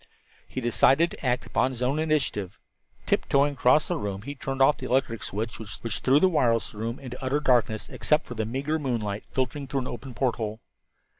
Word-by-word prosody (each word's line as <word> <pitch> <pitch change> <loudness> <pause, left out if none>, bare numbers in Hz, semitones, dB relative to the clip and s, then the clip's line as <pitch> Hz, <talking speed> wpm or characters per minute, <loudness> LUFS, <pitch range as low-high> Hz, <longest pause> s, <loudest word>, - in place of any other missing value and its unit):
He 130 - -5
decided 135 +7 +4
to - - -11
act 125 -1 0
upon 130 - +1
his 125 -1 -4
own 135 +5 +1
initiative. 145 - 0 0.5
Tiptoeing 140 +1 +2
across 135 +3 +4
the 175 - -1
room, 100 -3 -4
he 140 +4 -5
turned 135 -1 -5
off 135 +2 +5
the 130 - -5
electric 125 -4 0
switch, 110 +4 -4
which 110 0 -4
threw 135 +3 +4
the 190 - +5
wireless 120 -12 +1
room 115 +3 -4
into 125 -1 -8
utter 135 +3 +1
darkness 120 -6 +2
except 150 0 +1
for - - -7
the 110 -2 -2
meagre 140 +6 -1
moonlight 110 -7 -2
filtering 135 +2 -2
through 135 0 -1
an 125 - -4
open 125 0 -7
porthole. 115 -4 -1
130 Hz, 195 wpm, -26 LUFS, 115-140 Hz, 0.5 s, off